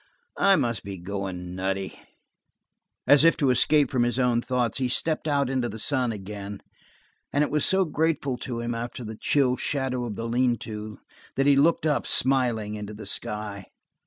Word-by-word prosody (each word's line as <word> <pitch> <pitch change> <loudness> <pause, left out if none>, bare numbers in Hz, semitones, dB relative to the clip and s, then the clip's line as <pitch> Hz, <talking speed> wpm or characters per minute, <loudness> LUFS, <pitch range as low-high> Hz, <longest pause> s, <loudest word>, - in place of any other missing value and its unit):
"I 195 -1 +6
must 115 - -1
be 100 0 -6
going 90 -1 -5
nutty." 95 +1 -3 1.1
As 145 +1 +6
if 165 - +5
to 140 -4 +3
escape 145 +4 +3
from 130 -3 +1
his 120 +1 +1
own 125 -2 +2
thoughts, 125 -2 -1
he 130 - +1
stepped 155 +5 0
out 140 -2 +2
into 130 -2 -1
the 110 - -7
sun 125 +1 +1
again, 100 -1 -7 0.7
and 145 - +2
it - - -2
was 150 0 +1
so 190 0 +3
grateful 150 -4 0
to 120 -1 -4
him 120 0 -2
after 120 +1 -5
the 110 0 -6
chill 130 +2 +2
shadow 130 -3 -2
in 105 - -5
the 115 +2 -4
lean 120 0 +2
to, 105 -1 -7 0.4
that 135 - +1
he 140 -1 +6
looked 155 +3 +3
up, 150 -2 +1
smiling, 120 -5 +1
into 105 0 -6
the 105 - -9
sky. 105 -1 -5
120 Hz, 185 wpm, -26 LUFS, 105-140 Hz, 1.1 s, I